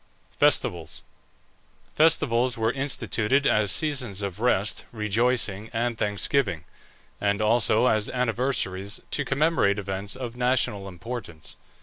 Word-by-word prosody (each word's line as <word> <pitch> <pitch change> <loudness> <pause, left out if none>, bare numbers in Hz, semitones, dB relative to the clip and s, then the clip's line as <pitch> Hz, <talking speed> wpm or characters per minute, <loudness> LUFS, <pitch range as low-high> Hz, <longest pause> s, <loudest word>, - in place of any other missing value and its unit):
FESTIVALS. 85 -2 0 0.9
Festivals 125 -6 +2
were 110 0 +1
instituted 135 -1 0
as 105 -5 +3
seasons 125 -8 0
of 100 0 -4
rest, 110 -4 +1
rejoicing, 110 -1 -1
and 120 +1 -1
thanksgiving, 105 - 0 0.6
and 100 0 +1
also 110 +1 +3
as 110 -4 +2
anniversaries 115 -5 -1
to 145 - 0
commemorate 140 -8 +2
events 100 +1 -4
of 125 -2 -6
national 125 -5 0
importance. 100 -4 -8
110 Hz, 105 wpm, -25 LUFS, 100-125 Hz, 0.9 s, as